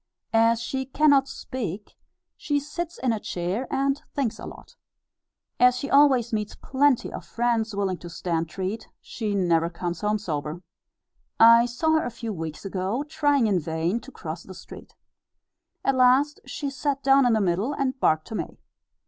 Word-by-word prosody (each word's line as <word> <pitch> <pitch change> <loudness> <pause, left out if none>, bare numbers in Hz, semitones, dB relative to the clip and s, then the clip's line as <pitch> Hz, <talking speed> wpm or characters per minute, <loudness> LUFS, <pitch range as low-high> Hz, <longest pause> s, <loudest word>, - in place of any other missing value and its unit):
As 230 0 +4
she 265 +3 -3
cannot 280 -1 +4
speak, 210 -8 -6 0.4
she 290 -1 -1
sits 335 +4 -6
in 250 -3 0
a 220 - -2
chair 185 +8 -3
and 275 +1 0
thinks 235 -6 -1
a - - -7
lot. - - -12 0.8
As 250 0 +6
she 280 - -5
always 265 -5 +4
meets 210 -1 -2
plenty 275 -1 +1
of - - -6
friends 230 -2 -1
willing 195 -3 -1
to 175 - -9
stand 165 -1 -2
treat, 190 +6 -4
she 215 -3 -4
never 170 -3 +2
comes 175 0 -5
home 210 0 +1
sober. 160 -3 -4 0.8
I 230 +1 +8
saw 250 +7 0
her - - -2
a - - -2
few 230 -1 -6
weeks 160 0 -6
ago, 195 +7 -2
trying 290 -4 +1
in 200 -4 +2
vain 165 +6 -1
to 270 - -13
cross 165 -6 -7
the 185 - -12
street. - - -12 0.9
At 270 - +3
last 260 +3 +4
she 285 -2 -4
sat 275 +1 -2
down 270 -1 +5
in 240 - +3
the 220 - +3
middle, 195 +6 0
and 270 -2 -2
barked 155 -7 +2
to - - -7
me. - - -5
230 Hz, 175 wpm, -25 LUFS, 185-270 Hz, 0.9 s, I